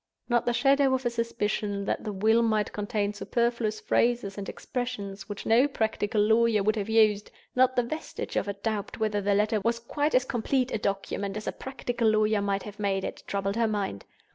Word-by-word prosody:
Not 240 -1 +1
the - - +4
shadow 275 +1 +4
of 260 0 -4
a 240 - +1
suspicion 210 -3 -2
that - - -2
the 215 - -3
Will 220 +4 +3
might 215 -2 +1
contain 205 0 -1
superfluous 235 0 -1
phrases 235 -5 +1
and 200 -1 -5
expressions 210 -6 -5
which 205 - -6
no 235 +5 +5
practical 220 -5 0
lawyer 220 -1 +3
would 215 +2 +2
have 210 -1 -3
used; 215 -2 +3 0.3
not 255 0 +4
the 245 - +3
vestige 310 +7 -5
of - - 0
a 200 - -1
doubt 205 0 -3
whether 215 -2 0
the 200 0 +2
Letter 210 +1 +2
was 230 +3 0
quite 290 +6 -1
as 255 0 +4
complete 255 +2 0
a - - -1
document 200 0 -2
as 215 - -6
a - - -1
practical 245 -3 -2
lawyer 215 -1 +2
might 200 -1 -1
have 210 0 -10
made 195 -2 0
it, - - -5
troubled 200 +1 -1
her 230 -1 +3
mind. 200 - -3
215 Hz, 200 wpm, -27 LUFS, 205-235 Hz, 0.3 s, no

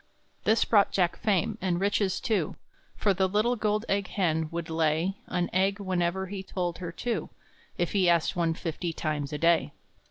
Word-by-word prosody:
This 220 +1 +4
brought 205 -3 +4
Jack 175 -3 +1
fame, 215 +1 0
and 180 -2 0
riches, 200 -1 +1
too; 195 -9 0 0.4
For 200 - +2
the 190 0 +1
little 215 +5 +2
gold 210 0 0
egg 195 -1 0
hen 160 -5 0
would 170 0 -4
lay 160 +3 +1
An 180 -1 0
egg 195 +2 +2
whenever 185 -1 0
he 190 0 -5
told 180 -2 -3
her 175 -2 -5
to, 240 +4 -2 0.5
If 175 - 0
he 190 -3 +3
asked 170 -2 +2
one 165 -2 +1
fifty 165 0 -3
times 150 -2 -2
a 150 - -2
day. 165 -3 +2
185 Hz, 180 wpm, -28 LUFS, 170-200 Hz, 0.5 s, This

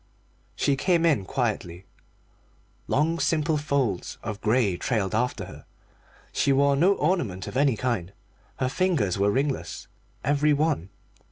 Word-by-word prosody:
She 140 - +1
came 170 +4 +2
in 140 - +2
quietly. 95 -7 -2 1.0
Long 160 +4 +1
simple 155 -1 +1
folds 140 - -1
of 105 -2 -5
grey 110 -4 +2
trailed 100 -1 -1
after 125 +3 -1
her: - - -12 0.7
she 140 - +2
wore 140 +1 +4
no 180 +8 +4
ornament 145 - -1
of - - -8
any 135 -4 +3
kind. 110 -8 -2 0.5
Her 130 - 0
fingers 135 - 0
were 100 +1 +3
ringless, 135 +5 -2 0.4
every 145 +2 +3
one. 145 - 0
135 Hz, 135 wpm, -26 LUFS, 105-150 Hz, 1.0 s, wore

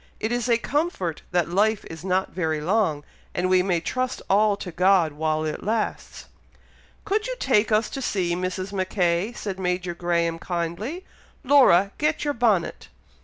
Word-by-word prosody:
It 220 - -2
is 245 0 -1
a 235 - +4
comfort 245 - -2
that 175 -1 +1
life 210 +3 +2
is 165 0 -9
not 190 0 0
very 160 -3 -1
long, 165 -3 0 0.3
and 180 +1 0
we 185 0 +4
may 180 -2 +1
trust 255 +8 -2
all 205 +1 +4
to 180 - -7
God 180 -2 +3
while 155 +1 -1
it 155 - -4
lasts." 220 +1 -3 0.8
"Could 425 +3 0
you - - -3
take 225 - +2
us 215 +1 +3
to 270 - -5
see 185 -8 0
Mrs. 185 +2 -3
Mackay?" 185 0 0
said 195 -5 -5
Major 180 -1 -1
Graham, 170 -1 -1
kindly. 180 - -4 0.4
"Laura, 245 -9 +5
get 300 0 0
your 290 - +1
bonnet." 220 -8 0
190 Hz, 165 wpm, -24 LUFS, 175-225 Hz, 0.8 s, Laura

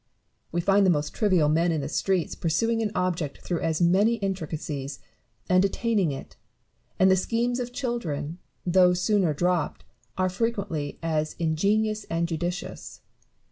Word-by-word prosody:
We 175 - 0
find 195 +3 +4
the 190 - +4
most 150 -3 0
trivial 185 -8 +3
men 165 +3 +2
in 160 -2 0
the 140 - -3
streets 180 +2 0
pursuing 225 +8 0
an 215 - 0
object 175 -5 -1
through 175 -2 -2
as 165 +1 0
many 200 +7 +4
intricacies, 155 -8 -4 0.5
and 185 +1 +4
attaining 200 -3 +1
it; 135 - -8 0.6
and 190 0 +5
the - - +6
schemes 235 +6 0
of 245 -1 -4
children, 185 - -3 0.3
though 180 0 +5
sooner 185 -2 +2
dropped, 175 +1 0 0.3
are 185 0 +2
frequently 185 -7 -2
as 155 -2 -1
ingenious 205 +6 +1
and 165 +1 -1
judicious. 175 +2 -5
180 Hz, 145 wpm, -26 LUFS, 160-205 Hz, 0.6 s, the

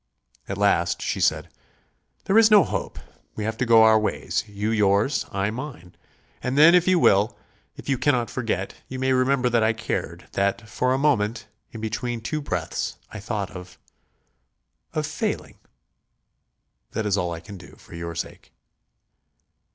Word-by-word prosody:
At 95 - -3
last 100 -4 +2
she - - -2
said: - - +1 0.7
"There 205 +3 +4
is 225 -1 +6
no 210 -3 +7
hope. - - -4 0.4
We 105 - -4
have 110 +1 -2
to 125 - -1
go 115 -1 +7
our 110 0 +6
ways; 105 - -1
you 105 +1 -3
yours, 105 +4 +2
I 100 +1 -1
mine. 120 - -8 0.5
And 130 +2 -2
then 155 +3 +8
if 180 0 +4
you 185 -1 +4
will 105 - +3 0.4
if - - -12
you 135 -3 0
cannot 125 -4 +1
forget 110 -6 -2
you 130 - -6
may 130 0 +1
remember 130 0 +2
that 115 -1 +3
I 110 +1 +3
cared; 115 +1 -4
that, 100 +3 -1
for 125 +4 0
a 130 - +2
moment, 115 -6 +1 0.3
in 110 - -8
between 115 +2 -3
two 150 +7 -3
breaths, 90 - -3 0.2
I 105 - -7
thought 105 -2 -4
of... 90 -3 -10 1.2
of - - -1
failing. - - -4 1.3
That 110 - -2
is 100 -2 +2
all 90 -3 -1
I 85 - -5
can 100 +3 -11
do... 90 - -14
for - - -17
your 85 0 -6
sake." 85 - -7
110 Hz, 165 wpm, -24 LUFS, 100-130 Hz, 1.3 s, then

